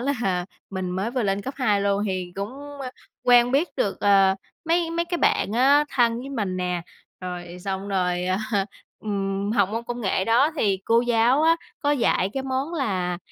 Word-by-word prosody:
là 240 Hz, -10 st, -1 dB, 0.2 s
mình 190 Hz, -2 st, -3 dB
mới 190 Hz, +5 st, -2 dB
vừa 250 Hz, 0 st, -1 dB
lên 200 Hz, -1 st, 0 dB
cấp 265 Hz, +5 st, -5 dB
2 215 Hz, -7 st, +2 dB
luôn 200 Hz, 0 st, +1 dB
thì 185 Hz, -2 st, -3 dB
cũng, 200 Hz, +1 st, -3 dB, 0.3 s
ơ, 260 Hz, -2 st, -4 dB, 0.3 s
quen 245 Hz, 0 st, +5 dB
biết 295 Hz, +6 st, +2 dB
được, 195 Hz, -, -1 dB
ờ, 195 Hz, -1 st, +5 dB, 0.3 s
mấy 335 Hz, 0 st, +1 dB
mấy 335 Hz, +1 st, 0 dB
cái 345 Hz, 0 st, -3 dB
bạn 205 Hz, -, +2 dB
á 275 Hz, +5 st, +5 dB
thân 235 Hz, -2 st, +2 dB
với 265 Hz, -, -7 dB
mình 205 Hz, -8 st, -2 dB
nè. 180 Hz, -1 st, -2 dB, 0.4 s
Rồi 180 Hz, -1 st, -6 dB
xong 195 Hz, 0 st, -3 dB
rồi, 180 Hz, -2 st, 0 dB
à, 185 Hz, +1 st, +1 dB, 0.6 s
ừm, 200 Hz, -1 st, -2 dB
học 200 Hz, -5 st, +3 dB
môn 225 Hz, +3 st, -4 dB
công 240 Hz, +1 st, -5 dB
nghệ 190 Hz, -3 st, 0 dB
đó 235 Hz, +8 st, +4 dB
thì 200 Hz, -8 st, +1 dB
cô 230 Hz, +1 st, +4 dB
giáo 240 Hz, +4 st, +3 dB
á, 330 Hz, +1 st, +5 dB, 0.2 s
có 290 Hz, -, +1 dB
dạy 230 Hz, -8 st, +2 dB
cái 270 Hz, -, -3 dB
món 265 Hz, +4 st, -2 dB
là 185 Hz, -, -1 dB
210 Hz, 195 wpm, -24 LUFS, 190-260 Hz, 0.6 s, quen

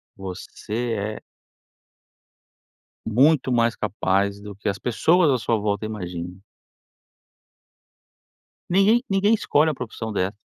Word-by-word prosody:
você 95 Hz, +2 st, -8 dB, 0.4 s
é -, -, -10 dB, 1.9 s
muito 130 Hz, +3 st, +3 dB
mais 115 Hz, -1 st, +2 dB
capaz 100 Hz, -1 st, -1 dB
do 105 Hz, -1 st, -9 dB
que 105 Hz, +2 st, -6 dB
as 100 Hz, -1 st, -1 dB
pessoas 160 Hz, +7 st, +3 dB
à 130 Hz, -, +3 dB
sua 115 Hz, -1 st, 0 dB
volta 105 Hz, 0 st, -1 dB
imaginam. 90 Hz, -4 st, -6 dB, 2.3 s
Ninguém 205 Hz, +7 st, +4 dB
ninguém 195 Hz, +3 st, +3 dB
escolhe 160 Hz, -7 st, +2 dB
uma 155 Hz, -, -2 dB
profissão 110 Hz, -3 st, -6 dB
dessa. 95 Hz, -1 st, -1 dB
110 Hz, 110 wpm, -23 LUFS, 100-150 Hz, 2.3 s, Ninguém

